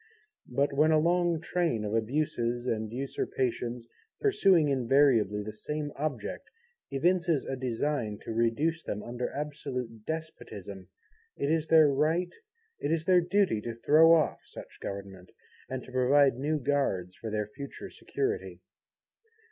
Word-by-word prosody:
But 140 +3 +1
when 150 +3 +4
a 155 - +5
long 170 +1 +2
train 165 -10 -1
of 105 - -3
abuses 120 0 -1
and 110 -3 -2
usurpations, 125 -2 -3 0.3
pursuing 195 - +4
invariably 125 -6 +3
the 105 +1 -6
same 150 +6 -4
Object 140 - -4 0.4
evinces 170 +2 +1
a 135 - -3
design 125 -3 -2
to - - -5
reduce 130 +9 +1
them 105 -7 -5
under 120 +1 -4
absolute 125 -6 -5
Despotism, 105 - -6 0.5
it 140 +2 0
is 160 -1 +1
their 160 -1 +7
right, 155 +6 +1 0.5
it - - -2
is 165 -1 0
their 180 -1 +5
duty, 180 - +1
to 115 0 -5
throw 155 +8 +5
off 155 -3 +1
such - - -12
Government, 95 -2 -7 0.4
and 130 -1 -4
to - - -13
provide 135 +2 +4
new 150 +5 -1
Guards 120 -11 -1
for 115 - -6
their 105 0 -1
future 140 0 -8
security. 415 +2 -3
140 Hz, 140 wpm, -29 LUFS, 115-160 Hz, 0.5 s, their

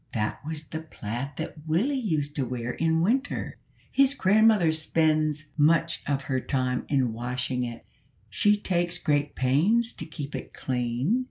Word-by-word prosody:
"That 105 +2 -2
was 155 0 -5
the 160 +1 -6
plaid 135 -3 -5
that - - -4
Willie 190 - +1
used 155 - -1
to 140 - +1
wear 125 -1 -3
in 160 +3 +1
winter. 260 +10 0 0.3
His 275 0 +4
grandmother 210 - +4
spends 155 -1 +1
much 165 +2 +3
of 140 -1 0
her 130 -2 -1
time 130 -1 -1
in 130 -5 +1
washing 125 +2 -2
it; 120 -1 -8 0.4
she 210 0 +3
takes 175 -3 0
great 145 -1 0
pains 190 - +2
to - - -7
keep 145 -2 -7
it - - -7
clean. 125 - 0
155 Hz, 155 wpm, -27 LUFS, 130-175 Hz, 0.4 s, His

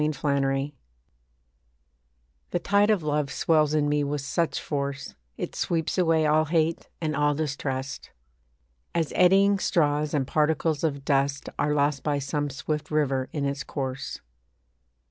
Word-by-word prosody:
THE 150 -1 0
LAW 140 -1 +1 1.8
The - - 0
tide 205 +1 +3
of 205 -6 +2
love 150 -2 0
swells 155 -1 +2
in 150 -1 +2
me 145 0 +1
with 145 0 -2
such 165 +4 -1
force, 140 -1 -4 0.2
It - - -4
sweeps 165 -2 -1
away 165 -3 +3
all 155 +1 +3
hate 165 +1 0
and 155 -2 -2
all 145 0 +2
distrust. 140 -3 -3 0.9
As 165 -3 0
eddying 195 +2 +5
straws 150 -4 +1
and 140 -2 +1
particles 155 +1 +1
of 140 -4 -1
dust 140 0 +1
Are 150 0 +1
lost 145 -1 +1
by 145 -1 0
some 145 +1 -2
swift 150 +3 -4
river 135 -4 0
in 145 -2 -2
its 140 0 -2
course. 135 -2 -5
150 Hz, 145 wpm, -26 LUFS, 140-155 Hz, 1.8 s, eddying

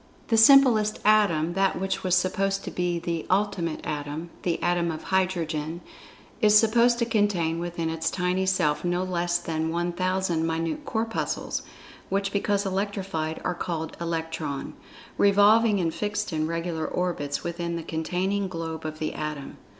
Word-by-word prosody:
The 225 - +3
simplest 225 -3 +6
Atom—that 195 -3 +3
which 190 0 -2
was 185 -1 +3
supposed 195 +2 0
to - - -5
be 175 -1 -1
the 170 -1 -3
"Ultimate 185 -4 0
Atom"—the 155 +4 -4
Atom 175 -1 +1
of 160 -1 -5
Hydrogen—is 175 +3 -1
supposed 235 +2 +4
to 235 - +1
contain 195 -7 +1
within 170 -1 -3
its 165 0 -1
tiny 185 +1 0
self 170 -6 +1
no 175 +1 0
less 175 -1 0
than 160 -2 -2
1,000 175 0 0
minute 165 -1 -2
Corpuscles, 225 0 -2 0.5
which 195 0 0
because 200 0 0
electrified 190 -5 -2
are 180 - +1
called 165 -2 -4
"Electron," 165 -4 -3 0.5
revolving 205 +2 +5
in 170 -3 0
fixed 210 +2 -3
and 155 -1 -1
regular 165 -1 -2
orbits 155 -6 -2
within 170 0 -3
the 165 - -4
containing 185 +5 -1
globe 165 -3 -5
of 155 0 -4
the 155 0 -3
Atom. 150 -2 -5
175 Hz, 140 wpm, -26 LUFS, 165-195 Hz, 0.5 s, simplest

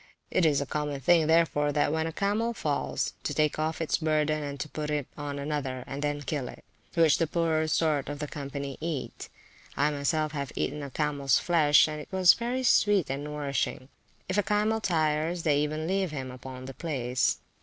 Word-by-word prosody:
It 170 - +3
is 145 -2 +2
a - - -2
common 150 0 -3
thing, 160 +3 +4
therefore, 160 -3 +3
when 155 +2 +1
a - - -3
camel 205 +6 0
once 235 -2 -4
falls, 145 -2 -1
to - - -3
take 150 0 +1
off 155 +1 -1
its 165 +1 0
burden 155 -1 +1
and 140 0 -5
put 150 -1 -3
it 150 -2 -1
on 145 -1 -5
another, 140 -3 -3
and 140 +2 -6
then 145 0 -2
kill 140 -2 -3
it; - - -11 0.3
which 165 -3 +4
the 165 - +2
poorer 160 -1 +1
sort 150 -3 +1
of 145 - -4
the 150 0 -4
company 140 -1 -6
eat. 160 -4 -4 0.5
I 145 +3 +3
myself 150 +2 0
have 140 -4 -4
eaten 150 +1 -2
of 140 -2 -8
camels 145 -3 +2
flesh, 155 -4 +4
and 155 -1 -5
it - - -12
is 185 -2 +6
very 245 +2 -2
sweet 205 - +3
and 140 +1 -3
nourishing. 140 -3 -3 0.4
If 185 +2 0
a - - +5
camel 210 +3 +1
tires, 160 -1 0
they 145 -2 +3
even 155 +1 -1
leave 190 +1 0
him 135 -4 -5
upon 130 0 -9
the 135 - -7
place. 130 -5 0
150 Hz, 195 wpm, -28 LUFS, 140-165 Hz, 0.5 s, is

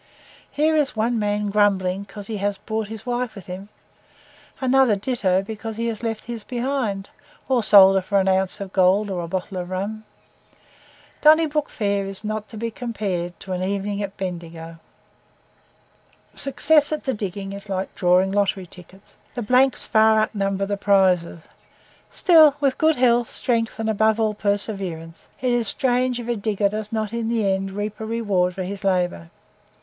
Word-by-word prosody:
Here 310 +2 +1
is 295 -5 +1
one 225 +2 0
man 205 0 -1
grumbling 195 -2 +2
because 200 0 -10
he 215 +1 -4
has 200 0 -1
brought 220 0 -4
his 220 +1 -9
wife 245 -1 -2
with 195 -4 -10
him, 190 +3 -8 0.9
another 260 -3 +3
ditto 195 -4 0
because 220 +1 -6
he 230 - -2
has 220 -2 -5
left 225 -2 -3
his 235 -2 -6
behind, 240 -6 -3 0.4
or 260 -2 +2
sold 195 -2 +8
her - - +2
for 200 +2 0
an 190 - 0
ounce 190 +2 +1
of 195 -1 -7
gold 195 +2 +3
or 180 -2 -2
a - - -5
bottle 185 +2 -4
of 180 0 -5
rum. 200 +4 -4 1.2
Donnybrook 305 -1 +4
Fair 200 -2 -1
is 195 +2 -7
not 215 0 -4
to 220 - -10
be 230 +1 -3
compared 195 -8 -4
to 190 - -5
an 180 - -3
evening 200 +2 -2
at 200 -1 -5
Bendigo. 165 -3 -6 1.6
Success 290 +2 +2
at 305 - -2
the 265 - -1
diggings 195 -2 -5
is 200 +1 -8
like 190 0 -3
drawing 180 +1 +2
lottery 195 -2 0
tickets 185 +2 -16 0.2
the 240 - -3
blanks 255 +4 +3
far 220 0 +4
outnumber 195 -2 -1
the 200 0 -2
prizes; 185 -5 +2 0.7
still, 315 -6 +6
with 275 -2 0
good 315 0 +4
health, 240 -1 +2
strength, 230 -3 -1
and 225 0 -3
above 220 +1 +2
all 215 -1 +1
perseverance, 195 -5 -3
it 250 -1 +1
is 240 -2 +1
strange 250 0 +1
if 240 - -7
a 240 - 0
digger 205 -1 0
does 215 0 -5
not 220 -1 -2
in 230 -1 -2
the 225 -3 0
end 195 0 0
reap 205 +2 -5
a 220 - -5
reward 200 -6 0
for 190 - -3
his 195 +2 -6
labour. 180 - 0
205 Hz, 175 wpm, -22 LUFS, 190-230 Hz, 1.6 s, sold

